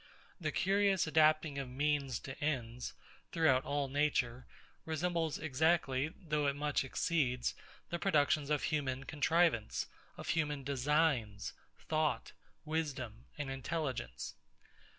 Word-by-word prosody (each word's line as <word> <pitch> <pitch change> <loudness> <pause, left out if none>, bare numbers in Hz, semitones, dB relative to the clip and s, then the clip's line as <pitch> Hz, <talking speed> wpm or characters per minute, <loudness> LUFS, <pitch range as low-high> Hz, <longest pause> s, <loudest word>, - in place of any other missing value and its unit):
The 155 -3 -1
curious 195 +1 +3
adapting 155 -2 +3
of 135 -2 -4
means 140 -1 0
to 135 - -6
ends, 125 -5 -2 0.4
throughout 145 -6 +4
all 145 -1 0
nature, 130 -3 0 0.4
resembles 165 0 -1
exactly, 155 -1 +2
though 150 -5 0
it 140 - +1
much 145 0 0
exceeds, 130 -2 0 0.4
the 170 - -1
productions 150 -5 +2
of 150 -1 +1
human 135 -4 -1
contrivance; 150 -4 +2 0.3
of - - -6
human 150 -4 0
designs, 135 -6 +1 0.2
thought, 155 -1 0 0.3
wisdom, 140 -8 -3
and 145 -2 -3
intelligence. 135 - -3
145 Hz, 110 wpm, -35 LUFS, 130-160 Hz, 0.4 s, throughout